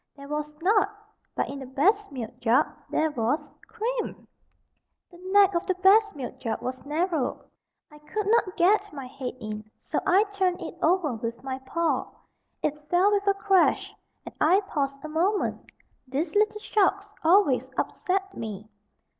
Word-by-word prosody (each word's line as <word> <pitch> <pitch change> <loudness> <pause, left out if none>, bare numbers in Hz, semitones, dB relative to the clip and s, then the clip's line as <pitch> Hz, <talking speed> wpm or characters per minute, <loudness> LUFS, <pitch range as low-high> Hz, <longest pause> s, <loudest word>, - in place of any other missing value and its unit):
There 280 0 -11
was 300 0 -4
not, 410 +1 +4 0.5
but - - 0
in 275 - -6
the 265 - -8
best 390 - +2
milk 245 -5 -7
jug 230 +2 +4 0.2
there 315 0 +1
was 285 +4 -1 0.2
CREAM! 460 +2 -4 0.8
The 345 - -15
neck 400 -1 +6
of 345 - -1
the 375 - +1
best 405 +2 +5
milk 265 -4 -7
jug 230 -3 -2
was 255 +1 -5
narrow. 315 -3 -1 0.5
I 300 - -14
could 400 +8 -4
not 420 -3 +2
get 405 +3 +3
my 275 -3 -7
head 255 0 -6
in, 215 -1 -5
so - - -3
I 390 +2 +5
turned 385 -3 -1
it 330 - -7
over 335 -5 +2
with 230 +1 -5
my 265 -1 -4
paw. 335 +2 0 0.6
It 300 0 -3
fell 365 +4 +4
with 405 -1 +1
a 395 - +4
crash, 390 -2 +2 0.3
and - - -8
I 360 +6 +5
paused 275 -7 -3
a - - -3
moment 355 +7 -1 0.4
these 290 +5 -2
little 425 +1 +2
shocks 405 -1 +1
always 295 - +4
upset 385 +1 -1
me. 215 -2 -6
335 Hz, 165 wpm, -26 LUFS, 275-400 Hz, 0.8 s, neck